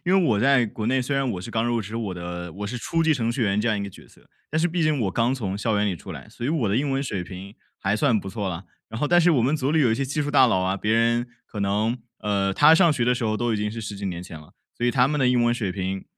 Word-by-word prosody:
因 180 - +1
因 190 0 +5
为 - - +2
我 105 -3 +2
在 130 -1 +4
国 105 +1 -5
内， 130 +2 +2
虽 140 +2 -2
然 135 -1 0
我 90 - -5
是 105 - -8
刚 115 0 0
入 120 -1 0
职 110 +2 -6
我 105 -5 -3
的 90 -1 -6
我 105 +2 -6
是 120 +3 -4
初 165 +7 -1
级 160 - +3
程 115 -6 0
序 120 +1 -2
员 100 0 +1
这 115 - 0
样 110 - +1
一 - - -3
个 100 - -4
角 - - -15
色， - - -23 0.2
但 155 - 0
是 165 - +3
毕 170 0 -1
竟 155 -2 +2
我 100 -5 0
刚 120 +6 +1
从 100 -6 -3
校 110 0 0
园 105 +1 +1
里 100 - 0
出 70 - -9
来， - - -10
所 120 - -8
以 - - -1
我 145 -9 0
的 100 - +1
英 140 +2 0
文 135 +1 0
水 100 -9 -3
平 95 +3 -9 0.2
还 95 +1 0
算 125 -6 +2
不 95 - -7
错 100 -1 -3
啦。 90 +1 -5 0.2
然 110 - -6
后 150 - +2
但 175 +3 +4
是 175 - +4
我 130 -8 +3
们 135 +5 +2
组 135 0 -1
里 160 - +3
有 120 -6 +3
一 - - +2
些 135 - -1
技 145 +3 -2
术 145 - -3
大 140 -3 +6
佬 95 -6 +2
啊， 95 +1 0
别 105 +3 -1
人 115 +1 +2 0.2
可 105 - -7
能， 105 +5 0 0.2
呃 100 -2 0
他 150 +7 +7
上 170 0 +5
学 130 -5 0
的 125 +1 +3
时 120 - -4
候 110 0 0
都 120 +1 0
已 - - 0
经 105 0 -2
是 115 - -6
10 105 -1 -6
几 100 0 -5
年 90 -2 -4
前 85 -4 -9
了， 75 - -17 0.2
所 120 - -1
以 - - +3
他 125 0 +3
们 150 0 -1
的 125 - +3
英 125 -1 +3
文 120 - +3
水 105 -6 -2
平 95 0 -4
115 Hz, 365 characters per minute, -24 LUFS, 100-135 Hz, 0.2 s, 他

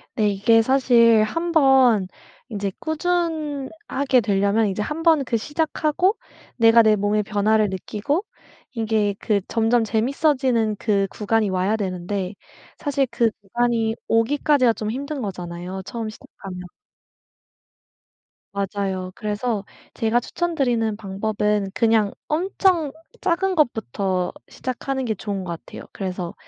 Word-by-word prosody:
네. 215 -2 +2
이게 225 +3 +4
사실 235 -3 +5
한번 265 - +3 0.4
인제 200 -3 -3
꾸준하게 315 -5 -1
되려면 205 +1 +2
이제 195 +2 -2
한번 315 +2 +2
그 235 -2 0
시작하고 310 - 0 0.4
내가 230 -1 +7
내 215 -1 +4
몸의 205 +1 +1
변화를 215 +1 +2
느끼고 215 - -2 0.5
이게 220 -4 0
그 210 -2 +1
점점 230 +1 +2
재밌어지는 250 -1 +1
그 200 -2 +1
구간이 215 0 0
와야 185 +3 +1
되는데 185 0 -3 0.4
사실 280 -2 0
그 235 -1 +2
구간이 225 +1 0
오기까지가 255 +1 +3
좀 215 -1 -4
힘든 280 +3 -4
거잖아요 180 -2 -5
처음 230 -3 -4
시작하면. 195 -3 -10 1.9
맞아요. 195 -2 -3
그래서 210 0 -2 0.3
제가 225 +1 +1
추천드리는 245 -10 -1
방법은 210 0 -1
그냥 220 -3 +3 0.2
엄청 345 -1 +1 0.3
작은 380 +1 +1
것부터 195 - 0 0.2
시작하는 265 +1 -4
게 220 - 0
좋은 200 -2 -4
것 175 - -5
같아요. - - -10
그래서 185 -3 -4
225 Hz, 265 characters per minute, -22 LUFS, 205-270 Hz, 1.9 s, 내가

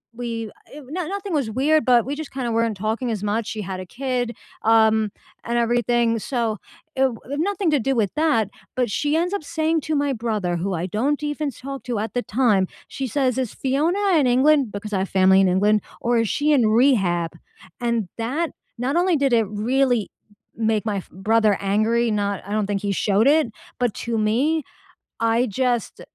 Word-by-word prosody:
we 230 -3 -4 0.2
eh 295 - -9
no 345 0 -3
nothing 395 0 -4
was 275 -8 0
weird, 295 +7 +2
but 245 -2 +4
we 280 - -3
just, 315 -1 -7
kinda 250 -3 -3
weren't 225 -2 0
talking 220 +4 -2
as 210 -2 -3
much, 210 +2 -1
she 220 -1 -4
had 185 0 -5
a 185 - -6
kid, 245 +1 -3 0.3
um, 220 -1 +4 0.3
and 235 0 -1
everything, 235 -1 +2
so 230 -2 -1 0.4
it - - -6
w 250 -4 0 0.2
nothing 390 -1 0
to 295 - +3
do 270 +3 0
with 210 -4 +1
that, 300 -9 +2 0.3
but 245 -4 0
she 295 +6 +1
ends 355 +3 0
up 400 -6 -2
saying 320 0 0
to 310 +1 -2
my 285 -1 +1
brother- 215 -7 -2
who 190 +3 -2
I 170 +2 -2
don't 275 - -1
even 295 0 -2
talk 275 +3 -7
to 245 -3 -2
at 220 0 -4
the 245 - 0
time- 210 -6 +2 0.2
she 270 - -4
says, 255 +1 0
"Is 250 -5 -2
Fiona 335 +10 +1
in 270 - +3
England?" 265 -1 +3
Because, 210 +1 -6
I 190 - +1
have 190 - -2
family 190 0 +5
in 195 - +4
England. 205 +3 +3 0.2
"Or, 235 0 +1
is 230 -2 0
she 295 +1 +1
in 250 -7 +4
rehab?" 200 - +3 0.5
And 235 -4 0
that 285 +9 -1 0.3
not 260 +6 -1
only 355 -1 +3
did 275 -3 +1
it 225 -2 +3
really 240 +2 +1 0.4
make 220 -1 0
my 210 -2 -1
f 190 - -7
brother 210 +2 +2
angry, 220 +4 +1
not 200 -1 -1
I - - -7
don't 210 -1 0
think 200 -1 -1
he 200 - 0
showed 205 +3 +2
it, 305 -1 +4 0.3
but 245 -4 +1
to 235 -1 -1
me, 265 +9 +1 0.6
I 230 +2 +2
just 245 +2 -1
235 Hz, 200 wpm, -22 LUFS, 215-275 Hz, 0.6 s, family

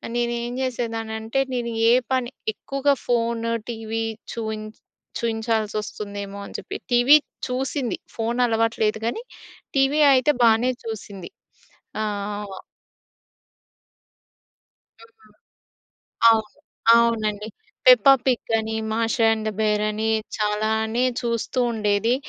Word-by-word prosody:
నేను 240 0 0
ఏం 240 0 -4
చేసేదాన్ని 230 -3 -3
అంటే 225 +4 -2
నేను 240 -1 -2 0.2
ఏ - - +6 0.2
పని 255 -2 +1 0.2
ఎక్కువగా 275 +5 0
ఫోన్ 235 -1 0 0.3
టీవీ 225 -1 -3 0.3
చూ‌యిం 220 -2 -4 0.6
చూయించాల్సి 225 -2 -1
వస్తుందేమో 200 -1 -6
అని - - -12
చెప్పి - - -7 0.2
టీవీ 245 +4 +7 0.3
చూసింది 255 0 -2 0.2
ఫోన్ 230 +1 -2
అలవాటు 230 -1 0
లేదు 215 0 +1
కానీ 235 - -2 0.5
టీవీ 275 +2 +3
అయితే 260 +3 +4
బాగానే 230 +2 +4
చూసింది 205 -5 -7 0.7
ఆ! - - 0 0.5
వ 190 - -8 2.4
హ్మ్. 455 -1 -21 1.0
అవును. 220 0 +1 0.4
అవునండి. 215 -3 +1 0.4
పెప్ప - - +7 0.2
పిగ్ 250 -3 0
అని 220 0 -3 0.2
మాష 225 +1 0 0.2
అండ్ 220 -1 -1
బేర్ 210 -1 +1
అని 215 +1 -1 0.3
చాలానే 220 +2 0 0.2
చూస్తూ 235 +1 -2
ఉండేది 215 +1 +1
225 Hz, 110 wpm, -23 LUFS, 220-245 Hz, 2.4 s, టీవీ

